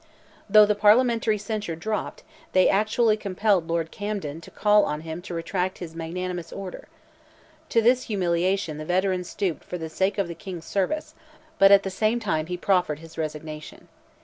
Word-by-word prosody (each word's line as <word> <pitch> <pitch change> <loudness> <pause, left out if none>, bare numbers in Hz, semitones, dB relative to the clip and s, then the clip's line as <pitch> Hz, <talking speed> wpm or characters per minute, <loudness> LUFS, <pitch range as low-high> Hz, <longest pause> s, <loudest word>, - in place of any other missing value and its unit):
Though 215 +1 +8
the 210 - +2
Parliamentary 220 +1 +3
censure 210 -4 -4
dropped, 215 +6 -4 0.3
they 185 0 +5
actually 215 +2 +2
compelled 200 -3 +1
Lord 165 -1 -1
Camden 200 -7 -4
to - - -12
call 210 0 +4
on 150 +1 -2
him 160 +1 -6
to 175 -1 -7
retract 180 +2 -2
his 170 -3 -8
magnanimous 175 +1 -4
order. 195 -2 -7 0.8
To 230 - +3
this 250 +2 +3
humiliation 180 -4 0
the 155 - -6
veteran 185 +1 +1
stooped 180 -1 -3
"for 180 - -6
the 160 -1 -6
sake 190 +5 0
of 200 -3 0
the 170 - -5
King's 170 -1 -8
service," 305 +11 -2 0.5
but 195 0 +7
at 200 0 +7
the 190 - -3
same 215 +5 +1
time 160 -8 -1
he 180 0 -3
proffered 180 -5 +1
his 165 +1 -13
resignation. 155 -1 -6
185 Hz, 175 wpm, -25 LUFS, 165-210 Hz, 0.8 s, Though